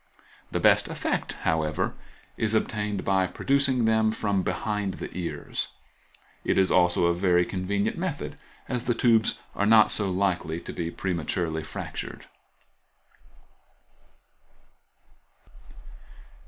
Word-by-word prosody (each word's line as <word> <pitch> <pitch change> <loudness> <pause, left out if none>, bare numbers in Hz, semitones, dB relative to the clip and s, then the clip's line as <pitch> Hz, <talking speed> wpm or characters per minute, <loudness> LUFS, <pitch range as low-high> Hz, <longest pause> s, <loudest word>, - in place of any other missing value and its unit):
The - - -1
best - - +5
effect, - - -2
however, 80 -1 0 0.4
is 110 -1 0
obtained 105 -2 -1
by 95 -1 +2
producing 135 +1 +1
them 110 -1 +3
from 100 -3 0
behind 105 -1 -2
the - - -7
ears; 90 -2 -3 0.8
it - - +1
is 95 -1 +4
also 90 -1 +4
a 85 - +3
very 90 0 +3
convenient 100 - -1
method, 165 -5 -3 0.3
as 125 -1 -2
the 120 - +1
tubes 115 -2 +3 0.2
are 100 - 0
not 110 -1 +6
so 100 -2 0
likely 90 -3 0
to - - -7
be 85 -2 -3
prematurely 85 -2 -2
fractured. 80 - -6
100 Hz, 115 wpm, -26 LUFS, 90-110 Hz, 0.8 s, not